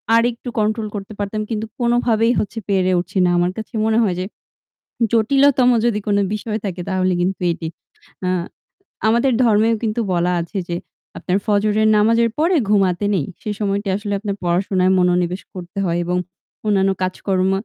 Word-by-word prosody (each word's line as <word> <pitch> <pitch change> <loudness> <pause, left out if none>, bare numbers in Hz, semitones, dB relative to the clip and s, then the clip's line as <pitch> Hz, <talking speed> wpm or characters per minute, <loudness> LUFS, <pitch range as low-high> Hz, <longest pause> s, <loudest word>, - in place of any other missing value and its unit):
আরেকটু 235 +1 +1
কন্ট্রোল 215 +1 0
করতে 200 +1 -6
পারতাম। 205 +1 -2
কিন্তু 220 -1 -2
কোনভাবেই 235 -1 +2
হচ্ছে 225 +2 -3
পেরে 185 -2 +2
উঠছি 180 +3 -5
না। - - +3
আমার 175 +1 +2
কাছে 220 +1 -7
মনে 220 0 +2
হয় 185 -4 0
যে 185 - -2 0.9
জটিলতম 255 +3 +4 0.2
যদি 225 -3 +1
কোন 205 -1 +2 0.2
বিষয় 215 0 -3
থাকে 185 -2 -4
তাহলে 185 -1 +1
কিন্তু 185 +2 -1
এটি। 165 -1 -4 0.6
আ - - +1 0.8
আমাদের 235 +4 +3
ধর্মেও 225 0 +3
কিন্তু 220 +1 0
বলা 175 +1 +1
আছে 170 +4 -6
যে 170 - -1 0.4
আপনার 185 +1 0
ফজরের 215 +1 +2
নামাজের 230 +2 +3
পরে 340 +4 +3
ঘুমাতে 195 -2 +2
নেই। 160 -7 0 0.2
সে - - -5
সময়টা 200 0 -1
আসলে 205 0 -4
আপনার 200 -1 -3
পড়াশোনায় 185 +1 +1
মনোনিবেশ 180 +1 +1
করতে 175 0 -9
হয় 170 -1 0
এবং 180 +1 0 0.5
অন্যান্য 195 -2 +3
কাজকর্ম 185 0 0
205 Hz, 160 wpm, -20 LUFS, 185-225 Hz, 0.9 s, জটিলতম